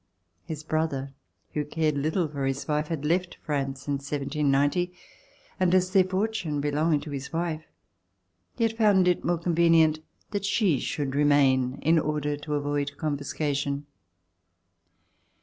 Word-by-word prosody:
His 155 -1 -6
brother, 155 -4 -2 0.4
who 150 - 0
cared 155 0 0
little 155 +5 0
for 140 -2 -3
his 135 0 -3
wife, 150 0 0
had 150 -3 -3
left 175 +3 0
France 140 -2 -3
in 140 -1 0
1790, 145 +4 0 0.7
and 185 -1 +3
as 185 0 +2
their 190 -1 +6
fortune 185 -5 -1
belonged 150 +1 +1
to 150 - -7
his 140 -1 -5
wife, 165 -1 -2 0.9
he - - +1
had 225 0 +1
found 205 -5 +4
it 180 - +2
more 175 0 +1
convenient 165 -2 +3 0.3
that 205 -2 -2
she 200 - +2
should 140 -3 -2
remain 135 -3 +3
in 160 +2 +4
order 150 -1 -1
to 150 +1 -4
avoid 145 0 -2
confiscation. 145 -1 -2
150 Hz, 140 wpm, -27 LUFS, 145-170 Hz, 0.9 s, their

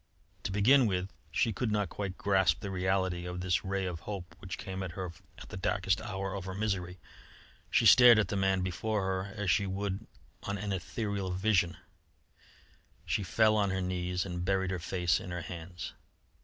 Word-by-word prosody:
To - - -1
begin 120 +6 +5
with, 95 -1 -1 0.2
she 115 - +1
could 110 +3 -1
not 105 -3 0
quite 95 -2 -4
grasp 95 -5 +2
the 100 -3 -4
reality 95 -1 0
of 90 0 -4
this 90 -1 +1
ray 95 0 -1
of 90 -3 -4
hope, 95 -1 -7
which 95 -1 -6
came 95 0 -6
to 95 - -2
her 90 +1 -5 0.3
at - - -11
the - - -6
darkest 95 0 0
hour 95 -1 -4
of 95 -2 -5
her 95 -1 -5
misery. 95 -4 -2 0.7
She - - +3
stared 120 +1 +9
at 110 - +2
the - - -1
man 95 -1 +2
before 100 +3 -1
her 95 +1 -2
as 105 -4 0
she 100 - +2
would 100 +2 -3 0.3
on 100 0 -3
an 100 0 -3
ethereal 100 +1 -3
vision; 90 -2 +1 1.3
she - - 0
fell 110 +3 +3
on 100 -2 +2
her 95 0 -1
knees 90 0 -1
and 90 -2 -4
buried 95 0 +1
her 90 - -2
face 90 -1 +1
in - - -8
her 90 -1 -4
hands. 90 +1 -7
95 Hz, 190 wpm, -31 LUFS, 90-100 Hz, 1.3 s, stared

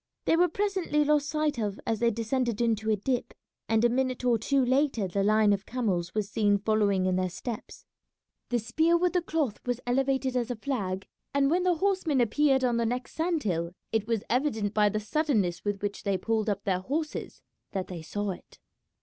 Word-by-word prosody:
They - - +4
were 355 +2 +4
presently 370 -5 0
lost 295 0 +2
sight 305 -3 0
of 205 -2 -2
as 225 -2 -1
they 235 - +3
descended 230 +1 -1
into 220 -2 +1
a 215 - +4
dip, 245 +5 -2 0.3
and 225 +1 +3
a - - +8
minute 255 0 -1
or 235 -2 +3
two 270 +3 +2
later 260 -5 +1
the 195 +2 -1
line 210 +1 +4
of 195 0 -3
camels 190 -8 -1
was 210 -2 0
seen 205 0 +2
following 205 -2 +1
in 185 -1 +1
their 185 0 0
steps. 225 +5 -7 0.6
The 245 - +1
spear 320 +9 +2
with 360 +1 +1
the 360 - +2
cloth 310 -9 -1
was 245 -1 -2
elevated 265 +1 +1
as 245 -1 0
a 245 - -2
flag; 205 -6 -3 0.3
and 280 0 +3
when 355 +2 +3
the 360 -1 +2
horsemen 370 -6 +1
appeared 265 +3 +3
on 240 -2 +2
the 235 - +1
next 250 +2 -3
sand 325 -1 0
hill, 170 -3 -1 0.2
it 220 -1 0
was 230 -3 0
evident 230 -6 0
by 210 -1 +4
the 215 +1 -1
suddenness 215 - 0
with 205 -1 -2
which 205 0 -3
they 195 -1 0
pulled 220 +2 0
up 200 -1 -2
their 185 -2 0
horses 300 - -4 0.3
that 190 -2 -2
they 175 -3 -7
saw 205 +5 -3
it. 180 - -11
235 Hz, 205 wpm, -28 LUFS, 205-280 Hz, 0.6 s, a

